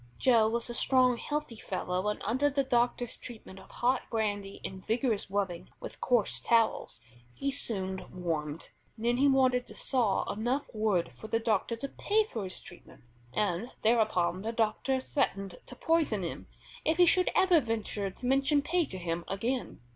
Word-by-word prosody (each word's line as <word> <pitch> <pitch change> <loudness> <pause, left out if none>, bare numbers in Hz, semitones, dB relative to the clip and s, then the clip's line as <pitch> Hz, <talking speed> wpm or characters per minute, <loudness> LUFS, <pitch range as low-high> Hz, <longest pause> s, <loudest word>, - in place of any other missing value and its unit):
Joe 230 -4 +4
was 235 +1 -1
a 240 - -5
strong, 255 0 +3
healthy 295 -4 -3
fellow, 185 -1 -2
and 210 - -1
under 260 +7 +2
the 275 0 +1
doctor's 245 -2 +1
treatment 215 -5 -9
of - - -15
hot 250 +2 +1
brandy 205 -3 -2
and 190 -1 -6
vigorous 225 -3 0
rubbing 195 -4 -2
with - - -9
coarse 240 -5 +2
towels, 225 - +1 0.3
he 275 - -1
soon 190 -7 -2
warmed. 160 -4 -3 0.3
Then 235 +2 +1
he 280 +2 +4
wanted 255 -2 +3
to - - -12
saw 235 -7 +1
enough 240 +7 -1
wood 210 - +1
for 125 - -10
the 225 +1 +1
doctor 225 0 0
to 235 +5 -5
pay 425 +9 +1
for 230 - -5
his 185 - -4
treatment, 175 - -13 0.3
and 205 - -1
thereupon 215 -6 +2
the 220 +2 -2
doctor 230 +4 0
threatened 195 -10 -2
to 250 - -10
poison 305 - +1
him 170 - -5 0.4
if 320 +1 +1
he 355 - +7
should 365 +1 +4
ever 365 -3 +5
venture 220 -5 -1
to 245 - -10
mention 275 +3 +3
pay 345 +2 +1
to 190 - -7
him 170 -1 -3
again. 235 - -2
225 Hz, 170 wpm, -30 LUFS, 195-260 Hz, 0.4 s, he